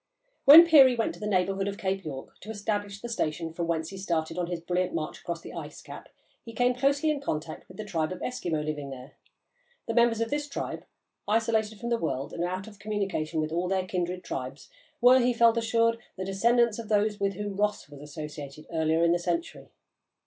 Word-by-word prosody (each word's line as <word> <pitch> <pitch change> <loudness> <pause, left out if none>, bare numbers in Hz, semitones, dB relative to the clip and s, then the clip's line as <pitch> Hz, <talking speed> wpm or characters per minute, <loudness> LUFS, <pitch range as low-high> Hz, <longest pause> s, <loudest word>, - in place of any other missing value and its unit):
When 315 +5 +11
Peary 275 -6 +7
went 230 - -1
to - - -13
the 210 - -4
neighbourhood 195 0 +1
of 200 0 -4
Cape 190 0 -2
York 135 -4 -8
to 215 - -12
establish 205 -1 -3
the 240 - -5
station 165 -7 -2
from 170 0 -3
whence 160 -1 -1
he 195 - -8
started 165 -4 -2
on 175 -1 -2
his 175 -1 -3
brilliant 180 +2 -1
march 155 -2 -4
across 170 -1 -5
the - - -10
ice - - -7
cap, - - -11 0.3
he 230 - -10
came 245 +2 +2
closely 280 +4 +2
in 290 -2 -3
contact 155 - -4
with 185 - -14
the 215 - -5
tribe 165 -6 -1
of 185 - -4
Eskimo 170 -11 -2
living 150 -2 -4
there. 130 +1 -9 0.7
The 230 - -2
members 235 -1 +3
of 230 0 -1
this 290 0 -2
tribe, - - -5 0.4
isolated 220 -1 +1
from 235 - -4
the 235 -1 +1
world 135 -4 -3
and 170 - -2
out 185 +2 -3
of 210 -1 -13
communication 195 -6 -2
with 155 0 -3
all 175 +2 -1
their 190 0 0
kindred 180 0 -3
tribes, 135 +2 -6 0.3
were, 250 +2 +7
he 245 0 +2
felt 235 -1 +5
assured, 230 0 +2 0.2
the 190 - -4
descendants 235 +4 +2
of 225 -3 -7
those 210 0 +1
with 200 0 0
whom 205 0 -4
Ross 210 -4 0
was 145 -1 -12
associated 150 0 -8
earlier 160 0 +1
in 170 - +4
the 175 - +2
century. 335 - -3
195 Hz, 215 wpm, -28 LUFS, 165-230 Hz, 0.7 s, When